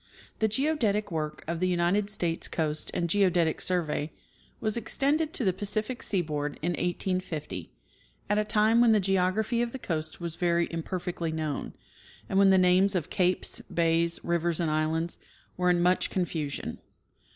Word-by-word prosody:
The 220 - +3
geodetic 220 - 0
work 155 -2 -3
of 165 0 -2
the 185 - +1
United 180 +3 +1
States 170 -5 -1
Coast 155 -2 -1
and 175 -1 -1
Geodetic 175 -3 +2
Survey 160 -4 -1 0.5
was 215 -1 0
extended 290 +7 +1
to - - -2
the 185 - +3
Pacific 215 +6 -3
seaboard 150 -6 -1
in 175 - +1
1850, 175 - -3 0.6
at 205 +1 +2
a - - +2
time 215 +2 +3
when 235 -2 +6
the 215 - +4
geography 195 +5 +1
of 240 -1 -2
the - - -3
coast 155 -9 -3
was 170 -1 -3
very 170 -1 +2
imperfectly 170 0 -3
known, 155 -2 -3 0.5
and 190 - +1
when 200 -1 +6
the 190 - +6
names 185 +2 +4
of 170 -5 -2
capes, 185 -2 0
bays, 170 0 +1
rivers 170 -1 0
and 165 -3 0
islands 160 +2 -1 0.4
were 180 0 +1
in 175 -1 +3
much 180 +1 +2
confusion. 160 -6 -3
180 Hz, 160 wpm, -28 LUFS, 165-205 Hz, 0.6 s, when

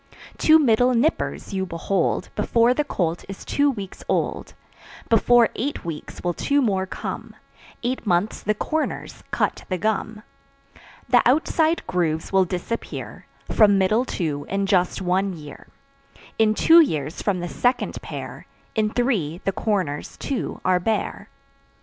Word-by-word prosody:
Two 315 0 +7
middle 250 -3 +3
"nippers" 255 -4 0
you 190 -1 -1
behold 175 +1 -1
Before 235 +1 +3
the 300 - 0
colt 175 - -2
is 195 - -8
two 285 0 +2
weeks 200 -8 -6
old, - - -1 0.5
Before 235 +1 +5
eight 280 -2 -3
weeks 160 -3 -7
will 175 0 0
two 285 - +1
more 195 -7 +1
come; - - -6 0.5
Eight 250 +2 -2
months 180 +3 +1
the 210 +1 0
"corners" 315 +8 -3
cut - - -1
the 185 - 0
gum. 215 +2 -2 0.8
The - - +5
outside 315 +4 +2
grooves 165 -1 -1
will 190 -1 +5
disappear 180 +6 -5 0.2
From 205 -2 +5
middle 215 +5 +3
two 155 - -3
in 195 0 0
just 190 -1 +1
one 190 +2 +1
year. 150 -3 -11 0.7
In 215 -1 +4
two 330 +8 +7
years, 155 - -1
from 195 -3 0
the 175 - -3
second 245 +8 0
pair; - - -8 0.3
In 215 -1 +1
three, 210 - 0
the 195 - +2
corners, 185 -8 -2
too, 275 -3 -4
are 185 -1 +3
bare. 220 +4 -2
205 Hz, 145 wpm, -23 LUFS, 180-245 Hz, 0.8 s, Two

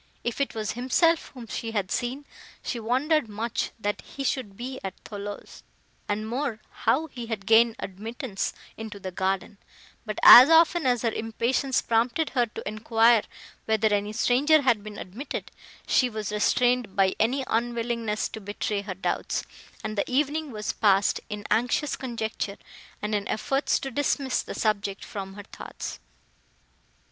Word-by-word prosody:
If 240 +3 -2
it 275 - -1
was 215 -1 -2
himself 315 +7 +2
whom 245 -2 -8
she 225 0 -5
had 200 -3 -1
seen, 260 +4 -2 0.4
she 240 - -3
wondered 260 +4 +1
much, 225 +4 -2
that 205 -1 -2
he 275 - -7
should 240 -7 -2
be 260 +2 -5
at 190 -1 -6
Thoulouse, 205 -1 -8 0.5
and 215 +1 -1
more, 245 -1 -2
how 310 +5 +1
he 245 -6 -8
had 220 -4 -4
gained 225 +1 +5
admittance 215 +3 -4 0.3
into 220 -2 -7
the 190 -1 -6
garden; 190 +2 -2 0.4
but 215 -2 -5
as 255 +4 +12
often 330 -1 +5
as 245 -2 +2
her 230 - +2
impatience 235 +5 0
prompted 240 +7 +1
her 245 -3 +2
to 215 - -8
enquire 225 +2 +4 0.4
whether 220 -1 +2
any 205 +1 0
stranger 275 +7 +3
had 235 -6 +2
been 210 -1 -8
admitted, 220 +10 -6 0.3
she 255 - +3
was 215 -2 -4
restrained 240 0 +2
by 195 -2 +3
an 260 +5 +2
unwillingness 230 -2 -1
to 220 - -8
betray 205 0 -2
her 200 -2 -6
doubts; 190 - -2 0.4
and 215 0 -3
the 200 - -2
evening 295 +3 0
was 215 -3 -3
passed 200 -2 +3
in 210 0 -6
anxious 250 +5 +1
conjecture, 220 -5 -4 0.5
and 210 +1 -2
in 205 -1 -1
efforts 270 +6 0
to 270 - -5
dismiss 275 0 0
the - - -7
subject 200 -2 -1
from 195 -1 -7
her 205 - -8
thoughts. - - -8
225 Hz, 155 wpm, -26 LUFS, 210-255 Hz, 0.5 s, as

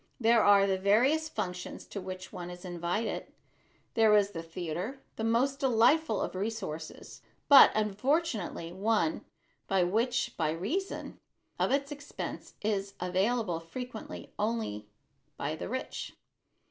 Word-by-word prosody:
There 230 -1 +5
are 200 -1 +6
the 190 -1 0
various 255 +11 +3
functions 180 -9 -5
to 200 - -6
which 185 0 -7
one 175 0 -6
is 180 +1 -9
invited. 175 +5 -2 0.6
There 220 -2 +5
is 200 -1 +2
the 165 -4 -5
theater, 175 - -5
the 220 - -4
most 250 +5 +2
delightful 265 +5 +3
of - - -2
resources, 185 -6 -5 0.3
but 285 - +10
unfortunately 215 - 0
one 220 - 0 0.4
which 225 +7 +1
by 160 -2 +1
reason 310 - -3 0.4
of - - +2
its 280 +1 0
expense 290 0 -7
is 200 -2 -1
available 185 +1 0
frequently 225 +7 -8
only 210 - -2 0.5
by 155 - -2
the - - -6
rich. 260 +3 -5
210 Hz, 125 wpm, -30 LUFS, 180-245 Hz, 0.6 s, but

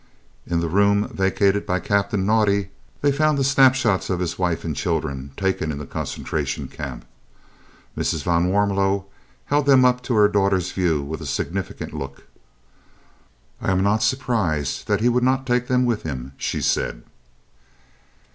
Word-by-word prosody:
In 85 -1 0
the 85 - -1
room 100 +4 +2
vacated 100 +1 +1
by 90 -1 0
Captain 100 +1 0
Naudé 100 -2 +2 0.3
they 145 - +3
found 155 +1 +2
the 135 - +1
snapshots 130 -6 +3
of 90 -2 0
his 90 -1 -3
wife 90 -3 -1
and 80 -3 -2
children 70 -1 -2
taken 95 -5 -1
in 75 - -5
the 75 - -6
Concentration - - -4
Camp. 70 -5 -7 0.9
Mrs. 80 - -1
van 85 0 +2
Warmelo 100 0 +1 0.4
held 145 0 +1
them 130 -2 +6
up 125 0 +3
to 125 -1 -2
her 105 -1 +6
daughter's 95 -3 +1
view 85 -6 0
with 80 +3 -6
a 80 - -6
significant 85 +7 -4
look. 70 -3 -7 1.4
"I - - -1
am 95 0 +2
not 105 +2 +2
surprised 110 - -1
that - - +1
he 120 - +3
would 125 0 +2
not 130 +1 +1
take 125 -1 0
them 125 0 +2
with 120 -3 0
him," 65 -4 -6
she - - -3
said. - - -1
100 Hz, 160 wpm, -22 LUFS, 85-120 Hz, 1.4 s, them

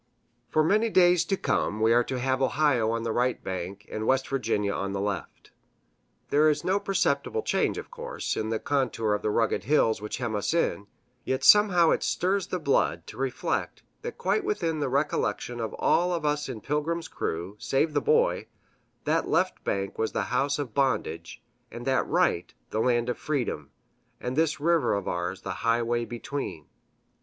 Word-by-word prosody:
For 155 - +3
many 215 +7 +3
days 180 -3 +5
to 195 - 0
come 105 - 0
we 110 +1 +4
are 120 +1 +4
to 130 - -3
have 130 +1 0
Ohio 135 -4 +2
on 115 0 -1
the 115 - -1
right 125 +2 0
bank 95 +3 -5
and 110 0 -4
West 135 0 +2
Virginia 110 -6 0
on 100 -1 -3
the 100 - -2
left. 100 0 -4 0.8
There 150 +2 +5
is 150 - 0
no 190 +2 +1
perceptible 200 - 0
change, - - 0
of - - -7
course, 485 0 -4
in 110 - -2
the 110 - 0
contour 120 -5 0
of 105 - -1
the - - 0
rugged 110 0 0
hills 115 -6 +2
which 105 - -4
hem 120 -3 -3
us 105 +10 -1
in; 105 -11 0 0.4
yet 130 - -2
somehow 190 -6 +6
it - - +1
stirs 190 +2 0
the - - -2
blood - - +1
to - - -11
reflect - - -2 0.2
that 475 0 -6
quite 430 - 0
within 165 - -1
the 145 -3 -1
recollection 135 -3 -1
of 110 -2 -3
all 180 +1 +2
of 165 -3 -3
us 150 -1 0
in 115 -4 -6
Pilgrim's 160 +5 -2
crew, 85 +5 -4
save 150 +3 0
the 145 - +2
Boy, - - +2 0.6
that - - 0
left - - +1
bank 100 0 -2
was 110 - -1
the - - 0
house 140 +3 +1
of 140 -7 -4
bondage, 130 - -1 0.3
and 120 +1 -8
that 135 -1 +1
right 85 -5 +1 0.2
the 110 - -1
land 120 -1 +2
of 125 - -2
freedom, 145 -5 -2 0.5
and 125 +1 -4
this 160 0 +1
river 165 -5 +2
of 100 - -3
ours 90 +2 -3
the - - -4
highway 115 +1 +1
between. 115 - -5
130 Hz, 185 wpm, -27 LUFS, 110-155 Hz, 0.8 s, somehow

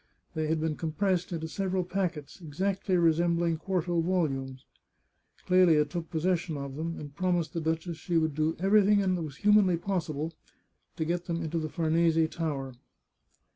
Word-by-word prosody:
They 155 -1 -1
had 160 +1 0
been 155 -1 -1
compressed 180 +3 -1
into 160 -2 -3
several 190 +2 -1
packets, 180 -3 -3
exactly 185 +4 -1
resembling 170 0 +2
quarto 175 -1 -1
volumes. 135 -7 -1 0.8
Clelia 180 -5 +5
took 165 +2 -5
possession 170 -1 -1
of 140 -1 -6
them, 165 +2 -4
and 145 -1 -9
promised 175 -3 0
the 165 - -2
duchess 160 +1 -2
she 170 +1 -1
would 160 -2 +1
do 155 +2 0
everything 205 +2 +4
that 185 -2 0
was 150 -4 -6
humanly 205 -3 +4
pos 180 -1 -2
sible 155 +1 -3 0.6
to 160 - -2
get 175 +2 -2
them 170 -1 -2
into 165 +1 -2
the 155 -1 -3
Farnese 165 -1 +2
Tower. 140 -6 -3
165 Hz, 160 wpm, -29 LUFS, 155-180 Hz, 0.8 s, Clelia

